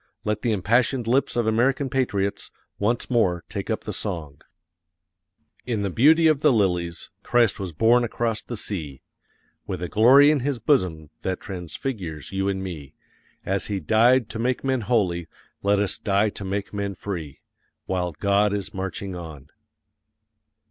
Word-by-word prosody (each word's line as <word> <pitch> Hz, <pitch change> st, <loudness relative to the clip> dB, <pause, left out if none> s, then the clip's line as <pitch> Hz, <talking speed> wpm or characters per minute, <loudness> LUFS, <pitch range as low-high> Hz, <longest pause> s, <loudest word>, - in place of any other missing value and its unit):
Let 105 Hz, 0 st, -1 dB
the 120 Hz, -, 0 dB
impassioned 115 Hz, +5 st, +1 dB
lips 130 Hz, +4 st, +1 dB
of 120 Hz, -2 st, +1 dB
American 125 Hz, +5 st, +2 dB
patriots 105 Hz, -7 st, -1 dB, 0.3 s
once 115 Hz, +4 st, 0 dB
more 95 Hz, -9 st, +1 dB
take -, -, -5 dB
up -, -, -1 dB
the -, -, -5 dB
song: 75 Hz, -5 st, -5 dB, 1.3 s
"In 110 Hz, -4 st, -1 dB
the 100 Hz, -, -1 dB
beauty 160 Hz, -, +5 dB
of 155 Hz, -3 st, +4 dB
the 150 Hz, -, +5 dB
lilies, 90 Hz, -7 st, 0 dB
Christ 120 Hz, -4 st, +2 dB
was 95 Hz, -3 st, -4 dB
born 115 Hz, +9 st, +4 dB
across 115 Hz, -1 st, -1 dB
the 120 Hz, -, -7 dB
sea. 75 Hz, -11 st, -5 dB, 0.6 s
With 90 Hz, -, -3 dB
a -, -, -2 dB
glory 130 Hz, -, +6 dB
in 150 Hz, -, +2 dB
His 135 Hz, +1 st, -1 dB
bosom 90 Hz, -, 0 dB
that 95 Hz, -1 st, -2 dB
transfigures 90 Hz, -, -6 dB
you 95 Hz, 0 st, 0 dB
and 95 Hz, -1 st, -2 dB
me; 80 Hz, -7 st, -7 dB, 0.5 s
As 95 Hz, 0 st, 0 dB
He 100 Hz, -2 st, -2 dB
died 115 Hz, -, +4 dB
to 110 Hz, -, -6 dB
make 125 Hz, +2 st, 0 dB
men 130 Hz, -2 st, 0 dB
holy, 95 Hz, -7 st, 0 dB, 0.3 s
let 100 Hz, +1 st, +2 dB
us 100 Hz, -1 st, -1 dB
die 100 Hz, +1 st, +2 dB
to 100 Hz, -, -8 dB
make 100 Hz, +1 st, -3 dB
men 100 Hz, -1 st, -3 dB
free. 85 Hz, -8 st, -6 dB, 0.4 s
While 90 Hz, -2 st, -2 dB
God 100 Hz, +4 st, +2 dB
is 100 Hz, -1 st, -4 dB
marching 95 Hz, 0 st, -4 dB
on." 80 Hz, -5 st, -9 dB
100 Hz, 160 wpm, -24 LUFS, 90-120 Hz, 1.3 s, glory